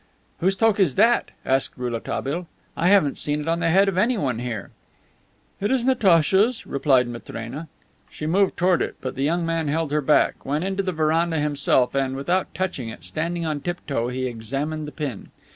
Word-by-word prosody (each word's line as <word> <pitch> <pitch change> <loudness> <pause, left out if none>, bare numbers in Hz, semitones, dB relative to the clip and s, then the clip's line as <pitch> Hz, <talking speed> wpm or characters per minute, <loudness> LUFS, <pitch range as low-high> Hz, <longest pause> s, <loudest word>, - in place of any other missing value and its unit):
"Whose 190 +3 +2
toque 220 0 +2
is 160 -9 +3
that?" 235 +1 +3 0.2
asked 135 0 0
Rouletabille. 130 +7 -3 0.3
"I 170 - +1
haven't 185 -8 +4
seen 150 0 -1
it 150 - -5
on 165 +1 +1
the 165 -1 +1
head 195 +4 +4
of 190 -2 +1
anyone 190 - +1
here." 120 -4 -5 0.9
"It 205 - 0
is 260 -2 +1
Natacha's," 210 -1 +3
replied 135 -3 +2
Matrena. 120 +5 -7 0.4
She 155 - -7
moved 190 +5 +2
toward 180 -1 +3
it, - - -2
but 130 - -4
the 135 - -5
young 170 +4 +1
man 165 -1 -1
held 155 0 -1
her 150 0 +1
back, 150 +2 +2
went 145 +4 -1
into 195 +1 -1
the 190 -1 -2
veranda 160 +1 +1
himself, 145 -4 +2
and, 135 -1 0
without 175 +8 -1
touching 155 -11 -3
it, 115 - -10
standing 170 +2 -2
on 150 -2 -2
tiptoe, 145 -9 -2
he 130 +1 -3
examined 135 +6 -4
the - - -7
pin. 145 -10 -5
155 Hz, 185 wpm, -23 LUFS, 135-185 Hz, 0.9 s, haven't